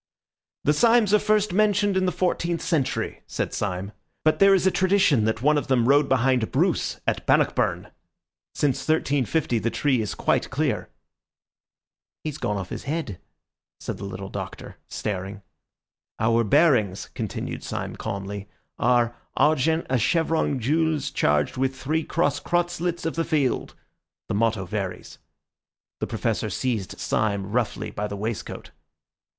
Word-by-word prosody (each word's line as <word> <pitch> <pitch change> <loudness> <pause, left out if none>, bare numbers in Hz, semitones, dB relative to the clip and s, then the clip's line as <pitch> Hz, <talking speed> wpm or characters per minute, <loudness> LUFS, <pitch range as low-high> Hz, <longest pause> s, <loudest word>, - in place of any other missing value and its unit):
"The 150 - +3
Symes 225 +3 +4
are 210 - +6
first 210 -2 +1
mentioned 205 -1 +3
in 190 0 +2
the - - +2
fourteenth 175 -2 -1
century," 150 -7 -1
said - - -3
Syme; 95 0 -3 0.3
"but 155 - +3
there 195 0 +7
is 190 - +1
a 190 - +5
tradition 185 - +3
that 110 +2 -1
one 150 +1 +4
of - - -7
them 120 -3 +2
rode 140 +1 +4
behind 130 -2 +2
Bruce - - +1
at - - 0
Bannockburn. - - +2 0.6
Since 140 -4 +1
1350 145 -4 +1
the 115 - 0
tree 130 +1 +1
is 105 - -3
quite - - +1
clear." - - -1 1.3
"He's 150 -2 -4
gone 105 0 -1
off 95 -2 -5
his - - -6
head," 145 - -3 0.6
said - - -5
the - - -7
little 100 0 -6
Doctor, - - -7
staring. 100 0 -4 0.7
"Our 115 +1 +2
bearings," 115 - +3
continued - - -4
Syme - - -4
calmly, 100 +1 -5 0.3
"are 120 -1 +2 0.2
'argent 155 +2 +3
a 130 -1 +1
chevron 160 +2 +1
gules 150 +3 0
charged 75 - +1
with 135 0 0
three 155 +5 -1
cross 145 -4 0
crosslets 175 -1 -1
of 165 - -1
the 165 - +1
field.' 150 -6 0 0.5
The - - -1
motto 110 -2 +1
varies." 95 0 -5 0.8
The - - -2
Professor - - -1
seized 115 -8 -2
Syme 100 -2 -1
roughly 120 0 -1
by 105 +1 -3
the 100 - -6
waistcoat. 110 +2 -5
135 Hz, 145 wpm, -25 LUFS, 110-165 Hz, 1.3 s, there